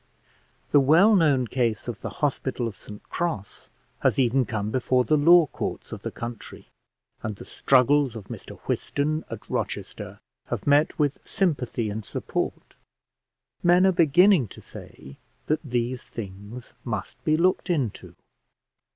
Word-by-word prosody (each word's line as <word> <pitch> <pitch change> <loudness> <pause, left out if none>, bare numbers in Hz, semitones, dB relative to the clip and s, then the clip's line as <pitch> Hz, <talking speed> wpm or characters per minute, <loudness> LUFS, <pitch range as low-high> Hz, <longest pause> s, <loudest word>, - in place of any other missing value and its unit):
The 145 - +6
well 165 +11 +6
known 145 -8 +3
case 115 -3 -1
of 120 -3 -5
the - - -4 0.2
Hospital 130 -3 -2
of 110 - -6
St 105 -1 -11
Cross 165 - -4 0.3
has - - +2
even 130 0 +3
come 105 -2 -3
before 130 +1 +2
the 155 - +2
law 165 +3 +6
courts - - -5
of - - -7
the - - -4
country, 120 -1 -8 0.5
and 110 - -4
the - - -11
struggles 135 -1 +3
of 110 -4 -8
Mr - - -9
Whiston, 155 +2 -1
at 115 -2 -8
Rochester, - - -4 0.3
have - - -4
met 145 +2 +3
with 145 -2 0
sympathy 125 - -1
and 110 +1 -5
support. - - -4 0.9
Men 175 +2 +5
are 190 - +5
beginning 175 - +5
to - - -12
say 70 +1 -12 0.3
that 155 - 0
these 125 -3 -3
things 105 +3 -8
must 105 -5 -5
be 155 0 +2
looked 185 +2 +1
into. 140 - -2
130 Hz, 145 wpm, -25 LUFS, 115-155 Hz, 0.9 s, The